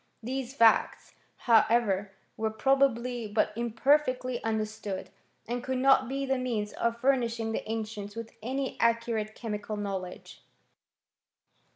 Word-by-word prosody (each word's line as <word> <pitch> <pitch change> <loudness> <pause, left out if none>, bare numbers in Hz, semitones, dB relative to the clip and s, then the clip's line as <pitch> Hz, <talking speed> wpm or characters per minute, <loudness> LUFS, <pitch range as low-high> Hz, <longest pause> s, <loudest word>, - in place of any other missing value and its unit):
These 260 +2 -4
facts, 230 -4 +3 0.3
however, 220 -4 +3 0.2
were 220 0 -1
probably 245 -1 +1
but 210 0 +1
imperfectly 255 +2 +1
under 220 -1 0
stood, 210 -3 -6 0.4
and 240 +1 -3
could 260 0 -2
not 260 -1 +4
be 275 +1 -2
the 265 -1 0
means 225 -5 -2
of 235 0 -1
furnishing 235 -4 +1
the 220 - -4
ancients 215 -2 -5
with 230 0 -7
any 265 +4 -3
accurate 230 -2 +1
chemical 210 -2 -4
knowledge. 195 -3 -6
230 Hz, 125 wpm, -29 LUFS, 215-255 Hz, 0.4 s, not